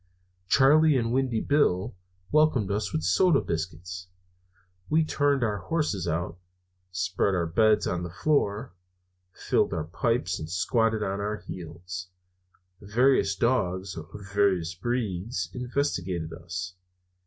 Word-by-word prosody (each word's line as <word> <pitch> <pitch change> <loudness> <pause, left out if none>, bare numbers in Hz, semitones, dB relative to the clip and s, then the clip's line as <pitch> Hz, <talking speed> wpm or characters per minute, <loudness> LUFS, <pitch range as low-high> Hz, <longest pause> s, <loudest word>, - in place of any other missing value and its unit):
Charley 150 - +5
and 115 -2 0
Windy 130 -4 +1
Bill 115 -8 +1 0.4
welcomed 150 -10 +3
us 100 -1 -1
with 80 - -2
soda 140 - +4
biscuits. 90 +2 -5 0.8
We 155 +1 +3
turned 145 -3 +1
our 105 -3 0
horses 100 - -1
out, 85 +1 -2 0.5
spread 90 +2 0
our 85 -2 +1
beds 110 +6 +3
on 90 -1 -1
the 90 - -4
floor, 105 - 0 0.6
filled - - 0
our 80 - -1
pipes, 90 +2 -1
and 80 - -6
squatted 110 +5 +1
on 100 0 -2
our 105 +1 -2
heels. 90 +2 -7 0.7
Various 105 0 +3
dogs 95 -5 0
of 80 -1 -7 0.3
various 95 -5 +2
breeds 95 -2 -2
investigated 95 - -2
us. 90 +2 -6
100 Hz, 120 wpm, -27 LUFS, 90-125 Hz, 0.8 s, Charley